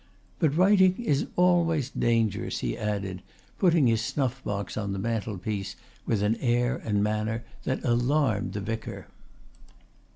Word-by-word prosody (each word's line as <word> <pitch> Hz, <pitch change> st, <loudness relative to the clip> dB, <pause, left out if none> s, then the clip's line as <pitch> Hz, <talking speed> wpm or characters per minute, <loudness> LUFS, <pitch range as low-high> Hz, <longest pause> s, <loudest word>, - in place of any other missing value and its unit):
"But 155 Hz, -3 st, +2 dB
writing 190 Hz, 0 st, +5 dB
is 150 Hz, -13 st, 0 dB
always 165 Hz, -6 st, +2 dB
dangerous," 115 Hz, -3 st, 0 dB
he -, -, -1 dB
added, 100 Hz, -3 st, -3 dB, 0.4 s
putting 170 Hz, -6 st, +4 dB
his 115 Hz, -2 st, +3 dB
snuff 130 Hz, +2 st, -2 dB
box 100 Hz, -1 st, -3 dB
on 100 Hz, -2 st, -2 dB
the -, -, -3 dB
mantelpiece 100 Hz, -2 st, -3 dB, 0.3 s
with 105 Hz, -3 st, +1 dB
an 105 Hz, +2 st, +1 dB
air 120 Hz, 0 st, +1 dB
and 105 Hz, -2 st, +1 dB
manner 110 Hz, +2 st, -1 dB, 0.2 s
that 130 Hz, -, -1 dB
alarmed 120 Hz, -2 st, +1 dB
the 105 Hz, -, -3 dB
vicar. 115 Hz, +2 st, -5 dB
115 Hz, 135 wpm, -27 LUFS, 105-140 Hz, 0.4 s, writing